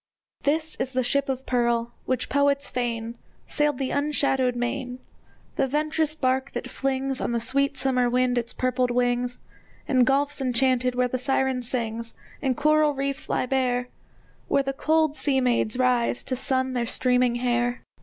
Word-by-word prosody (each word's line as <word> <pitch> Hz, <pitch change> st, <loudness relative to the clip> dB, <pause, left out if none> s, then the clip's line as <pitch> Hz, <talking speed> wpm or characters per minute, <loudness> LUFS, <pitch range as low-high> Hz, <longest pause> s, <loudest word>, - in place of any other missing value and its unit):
This 315 Hz, +2 st, 0 dB
is 265 Hz, -, -2 dB
the 255 Hz, 0 st, +1 dB
ship 275 Hz, +3 st, +1 dB
of 265 Hz, 0 st, -3 dB
pearl, 235 Hz, -1 st, 0 dB
which, 255 Hz, -2 st, 0 dB
poets 280 Hz, 0 st, +1 dB
feign, 235 Hz, -1 st, -3 dB, 0.3 s
Sailed 295 Hz, -2 st, +1 dB
the 265 Hz, -1 st, -2 dB
unshadowed 275 Hz, -3 st, +1 dB
main, 250 Hz, +1 st, -3 dB, 0.6 s
The 270 Hz, -, +2 dB
venturous 305 Hz, +2 st, 0 dB
bark 260 Hz, -2 st, 0 dB
that -, -, -5 dB
flings 270 Hz, 0 st, -2 dB
On -, -, -1 dB
the 235 Hz, -, +1 dB
sweet 275 Hz, +4 st, 0 dB
summer 255 Hz, -2 st, +1 dB
wind 250 Hz, 0 st, +2 dB
its 235 Hz, -, -5 dB
purpled 255 Hz, 0 st, 0 dB
wings 245 Hz, 0 st, 0 dB, 0.5 s
In 255 Hz, -3 st, +4 dB
gulfs 280 Hz, +2 st, +1 dB
enchanted, 255 Hz, 0 st, +1 dB
where 250 Hz, 0 st, +2 dB
the 255 Hz, +1 st, -3 dB
Siren 265 Hz, 0 st, 0 dB
sings, 230 Hz, -2 st, -3 dB, 0.3 s
And 260 Hz, -3 st, 0 dB
coral 305 Hz, 0 st, +3 dB
reefs 275 Hz, +1 st, -3 dB
lie -, -, +1 dB
bare, 250 Hz, -1 st, 0 dB, 0.6 s
Where 275 Hz, -, +2 dB
the 270 Hz, 0 st, -2 dB
cold 315 Hz, +1 st, +2 dB
sea 275 Hz, -3 st, +1 dB
maids 245 Hz, -2 st, +1 dB
rise 250 Hz, -2 st, +1 dB
to 260 Hz, -, -3 dB
sun 260 Hz, 0 st, 0 dB
their 240 Hz, -2 st, -1 dB
streaming 250 Hz, 0 st, +2 dB
hair. 245 Hz, 0 st, 0 dB
255 Hz, 165 wpm, -25 LUFS, 245-275 Hz, 0.6 s, In